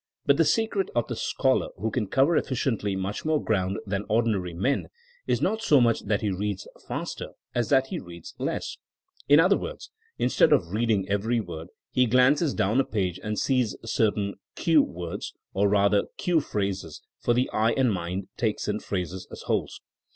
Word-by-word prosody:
But 140 0 +4
the 165 - +4
secret 205 +2 +1
of 120 - +1
the - - -3
scholar - - +1
who 110 +1 -2
can 115 -5 -1
cover 135 - +3
efficiently 115 -8 0
much 95 +2 -3
more 155 -1 +2
ground 95 -5 0
than 100 0 -2
ordinary 105 -6 +1
men 115 +11 0 0.4
is - - +1
not 220 0 +1
so 150 -11 +5
much 115 -2 +2
that 105 0 +1
he 105 - 0
reads 100 +1 -3 0.2
faster, - - -5 0.2
as 120 -2 0
that 135 -2 +4
he - - -3
reads 85 -2 -10
less. - - -3 0.5
In 145 +2 +8
other 185 +4 +4
words, - - -7 0.3
instead - - +4
of 85 -3 +1
reading 105 -2 +1
every 110 +4 +1
word 80 -6 -6 0.2
he 125 -1 +3
glances 130 +6 +4
down 105 +7 +2
a - - +5
page 95 -6 -2
and 105 -1 -3
sees 125 -6 +1
cer 110 -1 +2
tain 100 -1 -3 0.2
cue'' 160 -4 +4
words 85 -1 -6 0.2
or 100 +1 +2
rather 100 0 +3
cue'* 170 -3 +2
phrases, 100 - -3 0.2
for 120 - +1
the 125 +2 +2
eye 110 +2 +2
and 130 -5 +2
mind 90 +1 -3
take 110 -3 0
in 105 0 -1
phrases 95 -1 -4
as - - -9
wholes. - - -2
110 Hz, 185 wpm, -26 LUFS, 100-130 Hz, 0.5 s, In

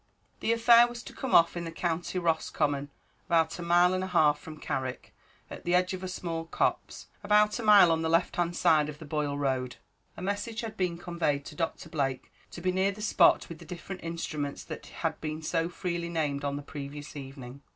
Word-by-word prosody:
The - - 0
affair 235 +1 +7
was 240 0 -8
to - - -10
come 265 - -1
off 170 +1 +6
in 175 - -3
the 165 - -5
County 170 +2 -2
Roscommon, 150 -4 0 0.4
about 165 0 +2
a - - -4
mile 175 +1 +4
and 185 0 -1
a - - -3
half 150 -5 +3
from 155 +1 -10
Carrick, 130 -3 -4 0.3
at - - -9
the 175 +1 +2
edge 180 +1 +2
of 185 - -5
a - - -3
small 170 -3 -4
copse, 165 - -1 0.2
about 210 +2 +3
a - - -4
mile 205 -5 +7
on 160 0 +1
the 160 - 0
left 165 +2 +2
hand 175 0 0
side 155 -3 +3
of 150 - -7
the 155 - -10
Boyle 145 -1 -2
road. 130 -3 -1 0.4
A - - -7
message 205 +4 -2
had 225 -2 -6
been 180 -3 -1
conveyed 170 -5 -1
to 150 - -9
Doctor 165 +1 -3
Blake 135 -4 -2 0.2
to 175 - -9
be 185 +1 +1
near 190 +2 +1
the 200 - -11
spot 210 0 +4
with 165 -2 -9
the - - -11
different 185 +1 -8
instruments 155 -4 -4
that - - -8
had - - -4
been 155 0 -4
so 165 +1 0
freely 175 -1 -3
named 150 -4 -1
on 140 0 -1
the 145 - -5
previous 145 +1 -8
evening. 135 -1 -9
165 Hz, 215 wpm, -29 LUFS, 150-185 Hz, 0.4 s, affair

